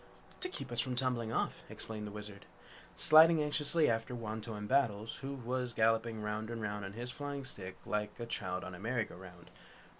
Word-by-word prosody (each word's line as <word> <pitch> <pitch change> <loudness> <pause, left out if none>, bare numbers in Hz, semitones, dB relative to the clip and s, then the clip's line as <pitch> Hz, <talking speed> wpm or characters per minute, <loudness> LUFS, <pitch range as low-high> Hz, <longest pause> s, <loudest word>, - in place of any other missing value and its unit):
"To 365 - 0
keep 365 - -6
us 120 - 0
from 125 +1 0
tumbling 125 -3 0
off," - - -1
explained 105 -1 -5
the - - -6
Wizard, 105 -1 -9 0.5
sliding 160 +1 +8
anxiously 150 +1 +2
after 115 +2 0
Wantowin 110 -2 -4
Battles, 115 -3 +2
who 135 +1 -4
was 125 -1 -2
galloping 110 0 +2
round 105 +1 -2
and 115 -1 -4
round 105 -1 -3
on 95 - -6
his 120 +3 -5
flying 140 +1 -4
stick 95 -8 -6
like 105 +1 -2
a 120 - -3
child 95 -5 -3
on 95 - -6
a 90 - -8
merry 115 +2 0
go - - -12
round. 90 -1 -12
115 Hz, 190 wpm, -34 LUFS, 105-130 Hz, 0.5 s, sliding